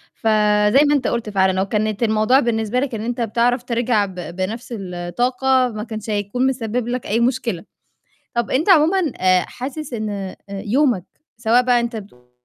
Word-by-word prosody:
فزَي 210 Hz, +2 st, +3 dB
ما 295 Hz, -, +3 dB
أنت 275 Hz, -, 0 dB
قُلت 235 Hz, -2 st, -2 dB
فعلًا 190 Hz, -1 st, +2 dB
لو 190 Hz, +1 st, 0 dB
كانت 215 Hz, +2 st, -1 dB
الموضوع 220 Hz, +4 st, +3 dB
بالنسبة 230 Hz, -1 st, 0 dB
لك 265 Hz, -3 st, -2 dB
إن 215 Hz, -, -4 dB
أنت 240 Hz, +1 st, -3 dB
بتعرف 235 Hz, +2 st, +1 dB
ترجع 235 Hz, -3 st, +1 dB
ب 190 Hz, -2 st, -10 dB
بنفس 185 Hz, +8 st, -5 dB
الطاقة، 245 Hz, +8 st, 0 dB
ما 210 Hz, -, -4 dB
كانش 220 Hz, -1 st, -7 dB
هيكون 210 Hz, +5 st, 0 dB
مِسبب 240 Hz, -2 st, -2 dB
لك 245 Hz, 0 st, -3 dB
أي 225 Hz, +3 st, +1 dB
مشكلة. 235 Hz, -6 st, -1 dB, 0.7 s
طَب 235 Hz, -1 st, -1 dB
أنت 310 Hz, +9 st, +1 dB
عمومًا 335 Hz, 0 st, +4 dB
آآ، 185 Hz, -1 st, +4 dB
حاسس 270 Hz, +2 st, -6 dB
إن 215 Hz, -2 st, -3 dB
أ 195 Hz, -2 st, -5 dB
يومك 215 Hz, +1 st, 0 dB, 0.3 s
سواء 235 Hz, +2 st, +3 dB
بقى 245 Hz, -1 st, +3 dB
أنت 235 Hz, 0 st, -3 dB
بتقول 125 Hz, -, -11 dB
225 Hz, 175 wpm, -20 LUFS, 205-250 Hz, 0.7 s, عمومًا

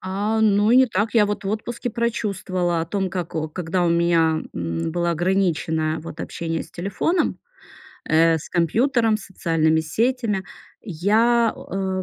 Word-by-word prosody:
А, 205 Hz, +4 st, -1 dB
ну 210 Hz, 0 st, +3 dB
и 245 Hz, -, +6 dB
не 260 Hz, 0 st, +6 dB
так. 220 Hz, +1 st, -1 dB
Я 210 Hz, -2 st, +5 dB
вот 205 Hz, 0 st, -4 dB
в 195 Hz, -, -2 dB
отпуске 235 Hz, +3 st, -3 dB
прочувствовала 190 Hz, -7 st, -1 dB
о 165 Hz, -, -3 dB
том, 190 Hz, +1 st, -2 dB
как 175 Hz, -2 st, -5 dB
о 155 Hz, -1 st, -2 dB
когда 175 Hz, +2 st, -2 dB
у -, -, +2 dB
меня, 170 Hz, -2 st, +2 dB
м, 85 Hz, -, -3 dB
было 175 Hz, -1 st, 0 dB
ограничено, 165 Hz, -3 st, 0 dB
вот 165 Hz, -, -8 dB
общение 165 Hz, -1 st, -3 dB
с -, -, -15 dB
телефоном, 200 Hz, -, -1 dB, 0.7 s
э, 165 Hz, +1 st, +3 dB
с 155 Hz, -, -11 dB
компьютером, 225 Hz, -, +2 dB
социальными 165 Hz, -6 st, 0 dB
сетями. 220 Hz, +4 st, -1 dB, 0.4 s
Я 220 Hz, +6 st, +2 dB
о 190 Hz, -1 st, -3 dB
190 Hz, 155 wpm, -22 LUFS, 165-215 Hz, 0.7 s, и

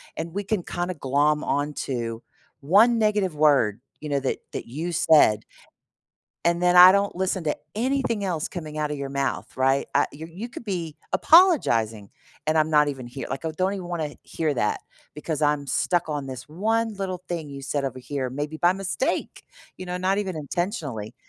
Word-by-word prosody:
and 165 Hz, +1 st, -5 dB
we 200 Hz, +3 st, -3 dB
can 210 Hz, -1 st, -1 dB
kinda 175 Hz, +1 st, -3 dB
glom 150 Hz, +1 st, +1 dB
onto 125 Hz, -5 st, -2 dB, 0.4 s
1 215 Hz, -, +4 dB
negative 205 Hz, -6 st, +1 dB
word, 135 Hz, -8 st, +3 dB, 0.2 s
you 150 Hz, -, -7 dB
know, 140 Hz, -1 st, +1 dB
that 135 Hz, -, -1 dB, 0.2 s
that -, -, -5 dB
you 160 Hz, +8 st, -4 dB
said 155 Hz, -11 st, +4 dB, 1.0 s
and 170 Hz, 0 st, +2 dB
then 180 Hz, 0 st, +3 dB
I 180 Hz, +1 st, +11 dB
don't 200 Hz, +1 st, +1 dB
listen 190 Hz, 0 st, -1 dB
to 150 Hz, -, 0 dB, 0.2 s
anything 240 Hz, -2 st, 0 dB
else 170 Hz, -5 st, -2 dB
coming 155 Hz, -3 st, -7 dB
out 150 Hz, -1 st, -1 dB
of 150 Hz, -, -3 dB
your 140 Hz, -1 st, -4 dB
mouth, 140 Hz, 0 st, -3 dB
right, 135 Hz, +1 st, +2 dB
I -, -, +3 dB
you 160 Hz, +3 st, -9 dB
you 200 Hz, +9 st, -7 dB
could 240 Hz, -, -9 dB
be 170 Hz, -7 st, -4 dB, 0.2 s
apologizing 115 Hz, -, +4 dB, 0.4 s
and 155 Hz, +1 st, +2 dB
I'm 155 Hz, 0 st, +3 dB
not 150 Hz, -1 st, +5 dB
even 135 Hz, -3 st, -4 dB
hear 135 Hz, +3 st, -7 dB
like, 135 Hz, +4 st, -4 dB
I 160 Hz, -, -1 dB
don't 185 Hz, +5 st, 0 dB
even 185 Hz, -3 st, -6 dB
wanna 160 Hz, -4 st, -3 dB
hear 160 Hz, -2 st, -2 dB
that 105 Hz, -, 0 dB, 0.3 s
because 150 Hz, 0 st, -4 dB
I'm 145 Hz, -1 st, +1 dB
stuck 175 Hz, +5 st, 0 dB
on 145 Hz, -2 st, -3 dB
this 130 Hz, +1 st, -8 dB
1 220 Hz, +7 st, 0 dB
little 185 Hz, -2 st, -4 dB
thing 170 Hz, -3 st, -4 dB
you 140 Hz, 0 st, -8 dB
said 140 Hz, +1 st, -2 dB
over 130 Hz, -1 st, -4 dB
here, 130 Hz, 0 st, -3 dB
maybe 145 Hz, +3 st, -4 dB
by 175 Hz, +3 st, +4 dB
mistake, 195 Hz, +6 st, -2 dB, 0.3 s
you 185 Hz, -, -7 dB
know, 180 Hz, 0 st, -3 dB
not 190 Hz, +2 st, +1 dB
even 190 Hz, -4 st, -2 dB
intentionally, 150 Hz, -, -3 dB
155 Hz, 190 wpm, -25 LUFS, 140-185 Hz, 1.0 s, I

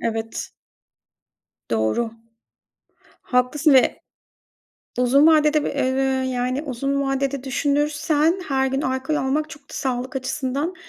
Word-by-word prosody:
Evet. 225 Hz, 0 st, -3 dB, 1.2 s
Doğru. 110 Hz, -, 0 dB, 1.1 s
Haklısın 265 Hz, +4 st, +2 dB
ve 260 Hz, -, +3 dB, 1.0 s
Uzun 260 Hz, +4 st, +5 dB
vadede 305 Hz, -1 st, +4 dB
bir, -, -, -1 dB
eee, 260 Hz, 0 st, 0 dB
yani 255 Hz, +2 st, -1 dB
uzun 275 Hz, 0 st, -2 dB
vadede, 270 Hz, 0 st, -1 dB
düşünürsen 295 Hz, +5 st, +1 dB
her 265 Hz, -1 st, +1 dB
gün 270 Hz, +1 st, -1 dB
alkol 260 Hz, +3 st, -1 dB
almak, 300 Hz, +2 st, -1 dB
çok 290 Hz, -, -11 dB
da 275 Hz, -, -18 dB
sağlık 260 Hz, 0 st, -3 dB
açısından, 270 Hz, +5 st, -2 dB
270 Hz, 110 wpm, -22 LUFS, 255-295 Hz, 1.2 s, Uzun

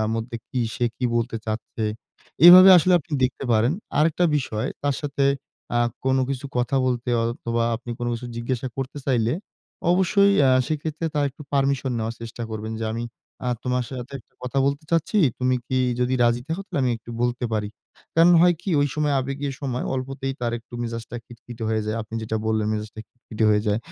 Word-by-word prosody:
মধ্যে 115 Hz, +1 st, -4 dB
কি 130 Hz, -4 st, -2 dB
সে 120 Hz, -, -1 dB
কি 130 Hz, -, -3 dB
বলতে 115 Hz, 0 st, -1 dB
চাচ্ছে? 110 Hz, +1 st, -4 dB, 0.6 s
এভাবে 185 Hz, +2 st, +11 dB
আসলে 180 Hz, +3 st, +2 dB
আপনি 155 Hz, +2 st, -17 dB
দেখতে 130 Hz, -, -2 dB
পারেন। 115 Hz, +4 st, +3 dB, 0.3 s
আরেকটা 165 Hz, +3 st, +3 dB
বিষয় 125 Hz, -2 st, -2 dB
তার 145 Hz, -1 st, +1 dB
সাথে 140 Hz, -1 st, -1 dB, 0.5 s
আ -, -, +3 dB, 0.3 s
কোন 130 Hz, 0 st, +2 dB
কিছু 135 Hz, +1 st, -3 dB
কথা 125 Hz, +2 st, 0 dB
বলতে 125 Hz, 0 st, -1 dB
অথবা, 115 Hz, 0 st, -1 dB
আপনি 120 Hz, +1 st, -9 dB
কোন 120 Hz, -, -3 dB
কিছু 120 Hz, +1 st, -6 dB
জিজ্ঞাসা 125 Hz, +2 st, -2 dB
করতে 135 Hz, +2 st, -4 dB
চাইলে, 120 Hz, -3 st, +2 dB, 0.6 s
অবশ্যই 200 Hz, +2 st, +4 dB
অ্যাঁ 130 Hz, -2 st, +5 dB
সেক্ষেত্রে 155 Hz, +1 st, -3 dB
তার 145 Hz, -1 st, +2 dB
একটু 150 Hz, -, -12 dB
পারমিশন 135 Hz, -2 st, +1 dB
নেওয়ার 115 Hz, +1 st, -3 dB
চেষ্টা 115 Hz, +1 st, -7 dB
করবেন। 110 Hz, 0 st, -5 dB
"যে, -, -, -2 dB
আমি 115 Hz, +1 st, -3 dB, 0.4 s
আ -, -, +1 dB, 0.2 s
তোমার 125 Hz, -1 st, 0 dB
সাথে 130 Hz, +1 st, -7 dB
একটা -, -, -35 dB
কথা 125 Hz, +2 st, -2 dB
বলতে 140 Hz, +2 st, -1 dB
চাচ্ছি, 165 Hz, +5 st, +1 dB, 0.2 s
তুমি 130 Hz, 0 st, +2 dB
কি 130 Hz, -, 0 dB, 0.2 s
যদি 125 Hz, +1 st, +1 dB
রাজি 120 Hz, +1 st, +2 dB
থাকো 165 Hz, +4 st, -2 dB
তাহলে -, -, -3 dB
আমি 125 Hz, -, +2 dB
একটু 115 Hz, +1 st, -12 dB
বলতে 120 Hz, +1 st, -1 dB
পারি।" 105 Hz, -1 st, -1 dB, 0.5 s
কারণ 165 Hz, +2 st, +6 dB
হয় 175 Hz, 0 st, +5 dB
কি? 195 Hz, -, -4 dB
ঐ -, -, +4 dB
সময় 150 Hz, -1 st, +1 dB
আবেগী 135 Hz, +2 st, -4 dB, 0.2 s
সময় 125 Hz, -2 st, -2 dB
অল্পতেই 135 Hz, +1 st, -3 dB
তার 120 Hz, -1 st, -1 dB
একটু 115 Hz, +2 st, -24 dB
মেজাজটা 115 Hz, 0 st, -5 dB
খিটকিটে 120 Hz, 0 st, -11 dB
হয়ে 110 Hz, -1 st, 0 dB
যায়। 110 Hz, -, -2 dB
আপনি 110 Hz, +1 st, -11 dB
যেটা 110 Hz, 0 st, -2 dB
বললেন 110 Hz, -1 st, +1 dB
মেজাজটা 110 Hz, 0 st, -5 dB
খিটখিটে 115 Hz, -2 st, -4 dB
হয়ে 105 Hz, 0 st, +3 dB
যায়। 105 Hz, 0 st, +2 dB
125 Hz, 190 wpm, -23 LUFS, 115-140 Hz, 0.6 s, এভাবে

